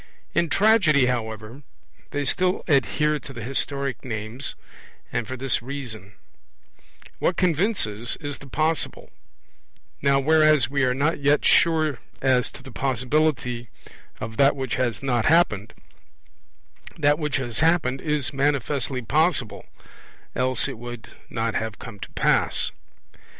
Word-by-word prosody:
In 170 - +1
Tragedy, 190 - +4
however, 110 0 -3 0.5
they 145 0 -2
still 185 +6 +1
adhere 150 0 +2
to 135 - -10
the 115 -3 -7
historic 135 0 -2
names; 115 +2 -5 0.6
and 115 - -1
for 130 - -5
this 130 -2 +1
reason: 120 -6 -7 1.1
what 175 - +1
convinces 165 - +1
is 145 -2 -5
the 140 - -12
possible; 155 +4 -1 0.9
now 140 0 +3
whereas 155 -2 +4
we 140 -1 +1
are 125 0 +1
not 145 +4 +1
yet 145 +1 +2
sure 155 -6 +3 0.2
as 130 -2 +2
to - - -13
the 135 - -11
possibility 130 -1 0 0.5
of 110 0 -6
that 140 0 +5
which 130 -2 -3
has 125 -1 -1
not 120 -4 +1
happened, 145 - +3 1.3
that 145 -1 +3
which 150 -2 -1
has 120 -4 -3
happened 155 -5 +2
is 150 -2 -1
manifestly 135 -2 0
possible, 135 - +1 0.7
else 130 0 +1
it - - -7
would 120 -1 -8 0.2
not 115 0 -2
have 110 -1 -3
come 115 -5 -10
to - - -7
pass. - - +2
135 Hz, 130 wpm, -24 LUFS, 120-150 Hz, 1.3 s, that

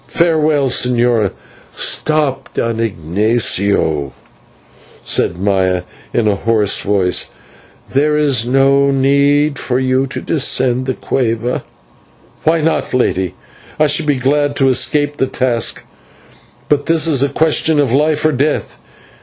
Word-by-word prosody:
Farewell, 155 -4 +1
señora." 120 -4 +1 0.5
"Stop, 145 -4 -1
Don 115 -1 -2
Ignatio," 100 - 0 0.9
said 85 - 0
Maya 95 -2 0 0.3
in 115 -2 0
a 105 - +2
hoarse 110 -2 +1
voice, 95 -3 0 0.6
"there 150 +2 +2
is 140 -6 +2
no 135 +2 +3
need 140 +2 +2
for 125 - -2
you 130 +1 0
to 135 - -6
descend 130 -3 +1
the 130 - -1
/cueva/." 120 -1 -2 0.8
"Why 160 0 +2
not, 160 -4 -1
Lady? 95 -8 -1 0.4
I 155 - +4
should 150 +1 +2
be 145 - +2
glad 145 +2 0
to 135 -1 +2
escape 145 +3 +1
the 130 - 0
task, 125 -3 -1 0.8
but 145 -1 0
this 165 -1 +2
is 145 -5 +1
a 140 - +2
question 160 +1 +1
of 140 -5 +1
life 150 +2 +1
or 155 - +3
death." 145 +2 -2
130 Hz, 130 wpm, -15 LUFS, 115-145 Hz, 0.9 s, I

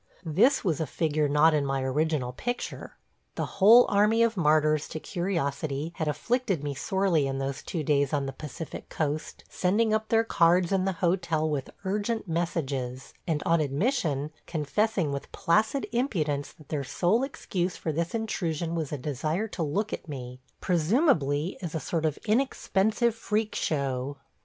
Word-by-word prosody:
This 210 - +3
was 170 -8 0
a 160 - -1
figure 155 -1 0
not 150 +3 +5
in 150 -2 +2
my 135 -1 -1
original 135 -1 0
picture. 245 - -4 0.4
The - - -1 0.2
whole 230 +5 +9
army 210 +3 +4
of 230 -1 +2
martyrs 155 -3 +3
to 155 - -5
curiosity 155 -4 -2
had 160 - -1
afflicted 190 - 0
me 145 -1 -2
sorely 175 0 +1
in 135 0 -2
those 135 +1 -3
two 165 -4 -4
days 140 -1 +2
on 145 -2 0
the 135 - -4
Pacific 150 +2 -8
coast, 155 0 -3
sending 215 +4 +1
up 220 0 0
their 225 0 +4
cards 175 -3 +3
in 190 -1 +2
the 195 - +1
hotel 170 -3 +1
with 145 -4 -2 0.2
urgent 210 +3 -1
messages, 140 -7 -2
and 155 -3 0
on 165 -1 +3
admission 150 - 0 0.2
confessing 175 +2 0
with 140 0 -5
placid 215 +9 +1
impudence 155 - -1
that 155 - -19
their 145 -3 -2
sole 180 - +1
excuse 185 -9 -3
for 160 - -2
this 170 +6 -2
intrusion 170 -7 -2
was 160 -4 -2
a 150 - -2
desire 155 - -2
to 185 - -5
look 200 +8 -1
at - - -6
me 125 -3 -7
– - - -44
presumably 170 - +2
as 170 -3 -5
a - - 0
sort 160 0 -1
of 150 - -2
inexpensive 220 -1 +1
freak 215 -1 -1
show. 140 -2 -1
160 Hz, 165 wpm, -27 LUFS, 145-200 Hz, 0.4 s, whole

